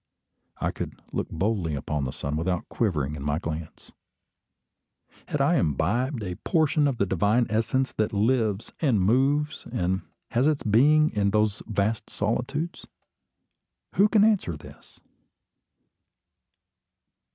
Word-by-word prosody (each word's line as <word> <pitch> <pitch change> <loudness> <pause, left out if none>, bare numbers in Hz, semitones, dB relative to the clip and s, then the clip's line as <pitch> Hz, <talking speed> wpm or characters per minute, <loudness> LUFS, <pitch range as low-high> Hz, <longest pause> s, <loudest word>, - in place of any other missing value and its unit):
I - - -1
could - - -6
look - - -2
boldly 90 -3 -1
upon 70 0 -2
the 65 - -3
sun 70 +3 -4
without 85 +2 -1
quivering 75 - -1
in 75 - -7
my 75 +1 0
glance. 80 -1 -6 1.4
Had - - -2
I - - +3
imbibed 115 - 0
a 90 -2 -4
portion 155 - +2
of 135 -4 -1
the 100 - +2
divine 105 +6 +2
essence 115 +4 +1
that 110 - +1
lives, 110 -1 0
and 130 -10 +2
moves, 140 +9 +1
and 95 -5 0 0.3
has 130 +3 +2
its 155 -2 +1
being 150 +8 +4
in 100 -1 +1
those 105 0 +1
vast 110 0 -1
solitudes? 135 - -2 1.1
Who 205 +2 +4
can 210 -2 +5
answer 200 - +2
this? - - -15
110 Hz, 130 wpm, -26 LUFS, 90-135 Hz, 1.4 s, can